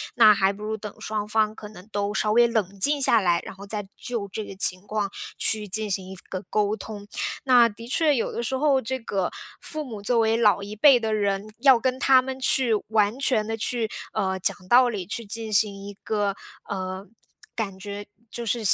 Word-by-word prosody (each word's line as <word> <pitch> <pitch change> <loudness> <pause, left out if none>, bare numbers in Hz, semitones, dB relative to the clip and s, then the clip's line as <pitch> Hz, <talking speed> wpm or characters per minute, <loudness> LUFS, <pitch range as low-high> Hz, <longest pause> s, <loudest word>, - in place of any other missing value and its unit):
那 220 -4 +8
还 195 -1 +2
不 210 +1 -10
如 220 +1 -3
等 210 -1 -8
双 215 -1 -3
方 215 0 +1
可 210 - -9
能 200 -2 -14
都 205 0 -1
稍 215 0 +1
微 235 +2 +5
冷 200 -4 -2
静 285 +6 +2
下 235 -3 +5
来， 175 -4 +2
然 - - -7
后 200 +1 -10
再 205 0 -1
就 230 -5 -4
这 215 +2 -5
个 195 - -9
情 185 -1 +1
况 210 -1 -1 0.3
去 215 -1 +1
进 215 +2 -2
行 190 0 -2
一 190 - -8
个 185 - -4
沟 210 0 +1
通。 205 0 -8 0.4
那 245 -3 +6
的 230 +1 -10
确 295 +3 +3
有 230 - -1
的 - - -3
时 265 - -2
候 275 -1 +3
这 260 +3 -3
个 195 -6 -2 0.3
父 310 0 -5
母 225 -7 -8
作 235 +3 +1
为 225 0 +2
老 210 -3 +3
一 205 +1 -7
辈 255 +5 +6
的 220 -1 -1
人， 205 0 -1
要 270 -3 +6
跟 255 +2 -1
他 260 0 +5
们 265 0 -6
去 255 -2 +3
完 215 +2 +1
全 250 -6 +2
地 225 +1 -3
去， 230 0 -1 0.2
呃， 190 -1 -1
讲 - - 0
道 250 +1 +6
理， 205 -6 -4
去 220 +5 -4
进 220 +1 -6
行 205 0 +3
一 205 - -7
个 205 -2 -1 0.3
呃， 190 0 -4 0.5
感 200 -4 -3
觉 205 +1 -7 0.2
就 235 +1 -6
是 235 +2 0
215 Hz, 230 characters per minute, -25 LUFS, 200-235 Hz, 0.5 s, 那